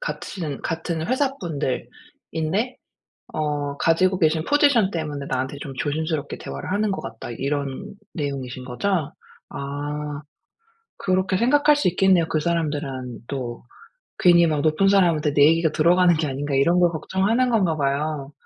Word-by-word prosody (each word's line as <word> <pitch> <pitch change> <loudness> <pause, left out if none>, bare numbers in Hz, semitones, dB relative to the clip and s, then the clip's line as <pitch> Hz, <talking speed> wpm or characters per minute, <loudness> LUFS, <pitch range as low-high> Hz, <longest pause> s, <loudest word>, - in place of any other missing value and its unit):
같은 170 - -5
같은 165 0 -3
회사 265 +1 +1
분들인데 160 - -4 0.6
어 145 -2 -2
가지고 185 +4 +2
계신 160 -2 +2
"포지션 285 -9 +4
때문에 150 -5 -4
나한테 130 +2 -2
좀 135 - -6
조심스럽게 155 0 -2
대화를 - - -6
하는 205 +1 +1
것 190 - -3
같다." 115 +1 -8
이런 140 - -3 0.2
내용이신 135 -5 -4
거죠? 150 +4 -1 0.4
아. 145 +1 -5 0.8
그렇게 185 0 +1
생각할 290 +6 +4
수 290 - +1
있겠네요. 180 -1 +3
그 155 - 0
사람들은 145 -8 -3
또 125 -4 -5 0.5
괜히 170 -1 +6
막 150 -2 0
'높은 160 +5 +3
사람한테 170 -7 +3
내 145 - +6
얘기가 165 +1 +3
들어가는 175 +3 +4
게 155 0 -1
아닌가?' 140 +1 -3
이런 170 +6 +3
걸 175 - +4
걱정하는 195 +9 0
건가 190 -9 +2
봐요. 145 0 -2
160 Hz, 315 characters per minute, -23 LUFS, 145-185 Hz, 0.8 s, 괜히